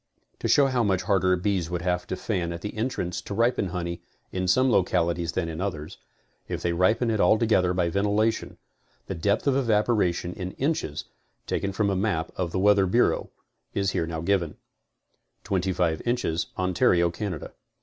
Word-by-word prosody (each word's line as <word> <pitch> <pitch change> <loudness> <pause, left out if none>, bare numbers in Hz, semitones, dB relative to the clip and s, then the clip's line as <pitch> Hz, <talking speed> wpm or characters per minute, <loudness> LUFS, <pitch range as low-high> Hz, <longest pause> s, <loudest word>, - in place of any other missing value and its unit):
To - - -2
show 140 - +5
how 130 -2 +1
much 95 -4 +1
harder 95 -3 +3
bees 90 -2 -1
would 85 -1 -3
have 90 -1 -1
to - - -2
fan 90 -5 -2
at 85 0 -6
the 105 - -5
en 110 +4 0
trance 90 -8 -3
to 100 - -5
ripen 115 -2 +2
honey 85 -1 -4 0.3
in 95 0 -2
some 130 +8 +4
localities 85 -4 +1
than 90 -3 -1
in 80 +1 -5
others, 80 -6 -4 0.5
if - - -3
they 85 - +1
ripened 105 +7 +2
it 110 - 0
altogether 110 -5 +3
by 90 -1 +1
ventilation, 105 +4 0 0.5
the - - -4
depth 100 +6 0
of 140 -2 +3
evaporation 105 -8 +1
in 90 -1 -6
inches, 135 - -2 0.4
taken 100 - -1
from 100 +1 0
a - - 0
map 90 -4 -1
of 90 -3 -2
the - - -2
Weather 100 0 +4
Bureau, 120 +7 +2 0.5
is 100 -1 +1
here 80 - -1 0.2
given: 85 -4 0 0.9
25 90 -4 0
inches, 120 -9 -1
Ontario, 90 -1 +2
Canada. 90 -3 -5
95 Hz, 170 wpm, -26 LUFS, 85-105 Hz, 0.9 s, show